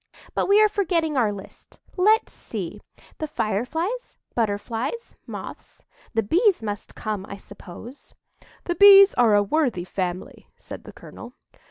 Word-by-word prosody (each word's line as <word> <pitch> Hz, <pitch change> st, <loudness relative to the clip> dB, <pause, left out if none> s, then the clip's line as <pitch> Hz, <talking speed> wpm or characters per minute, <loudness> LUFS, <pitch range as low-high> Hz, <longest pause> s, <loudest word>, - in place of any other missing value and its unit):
But -, -, -1 dB
we 405 Hz, +1 st, +6 dB
are 430 Hz, -, +6 dB
forgetting 345 Hz, -7 st, -1 dB
our 230 Hz, -5 st, +2 dB
list. 200 Hz, -2 st, -12 dB, 0.2 s
Let's 430 Hz, +5 st, +3 dB
see—the 310 Hz, -, -8 dB
Fireflies, 310 Hz, -, -3 dB, 0.2 s
Butterflies, 230 Hz, -, -3 dB
Moths. -, -, -10 dB, 0.3 s
The 225 Hz, -, +2 dB
Bees 360 Hz, -, +2 dB
must 205 Hz, -2 st, -6 dB
come, 210 Hz, -3 st, -4 dB
I 200 Hz, -, -7 dB
suppose." 200 Hz, +6 st, -13 dB, 0.5 s
"The 350 Hz, -, -2 dB
Bees 395 Hz, +2 st, +8 dB
are 230 Hz, -4 st, +4 dB
a 205 Hz, -, +4 dB
worthy 245 Hz, -, 0 dB
family," 185 Hz, -1 st, -5 dB
said -, -, -10 dB
the -, -, -10 dB
colonel. 240 Hz, +1 st, -12 dB
250 Hz, 135 wpm, -23 LUFS, -, 0.5 s, Bees